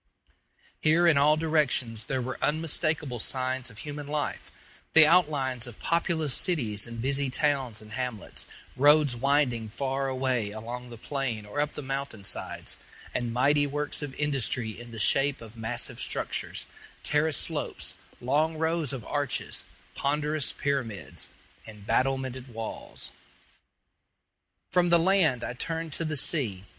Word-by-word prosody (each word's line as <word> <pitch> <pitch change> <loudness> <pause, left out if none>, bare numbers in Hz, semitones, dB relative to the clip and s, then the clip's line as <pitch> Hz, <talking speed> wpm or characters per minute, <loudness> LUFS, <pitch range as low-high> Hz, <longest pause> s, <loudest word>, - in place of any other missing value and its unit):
Here 160 +3 +4
in 165 -3 +6
all 150 +2 +5
directions 145 -8 +1
there 130 -2 -1
were 130 +2 -4
unmistakable 155 -3 0
signs 130 +1 -1
of 110 - -14
human 145 +2 -6
life 150 0 -3 0.4
the 160 -1 +10
outlines 145 -7 +3
of 120 - -10
populous 165 -4 +1
cities 120 - +2
and 115 0 -7
busy 135 +2 +1
towns 130 -5 +1
and 105 - -13
hamlets; 125 -3 -4 0.3
roads 145 -1 +5
winding 125 -3 +2
far 135 +4 -1
away 130 -4 0
along 120 +4 -6
the 120 - -9
plain 120 -4 -3
or 105 +8 -2
up 150 0 -1
the 150 - -6
mountain 135 -6 -4
sides, - - -2 0.4
and 120 -1 -1
mighty 145 +4 +3
works 145 +2 -2
of 145 -3 -5
industry 135 -5 0
in 120 +2 -10
the 115 - -9
shape 135 +6 +2
of 115 -1 -11
massive 110 -1 -1
structures, - - -2 0.4
terraced 150 0 +2
slopes, - - -2 0.3
long 150 +6 +1
rows 160 -3 0
of 125 -5 -5
arches, 145 -3 -1 0.3
ponderous 150 +1 +1
pyramids, 130 -8 -2 0.4
and 105 -2 -11
battlemented 130 0 0
walls. 115 -1 -6 1.6
From 175 -1 +3
the 170 - +7
land 170 -7 +3
I - - -3
turned 165 +4 -3
to 165 - -1
the 155 -1 -1
sea. 120 - +2
135 Hz, 140 wpm, -28 LUFS, 120-150 Hz, 1.6 s, the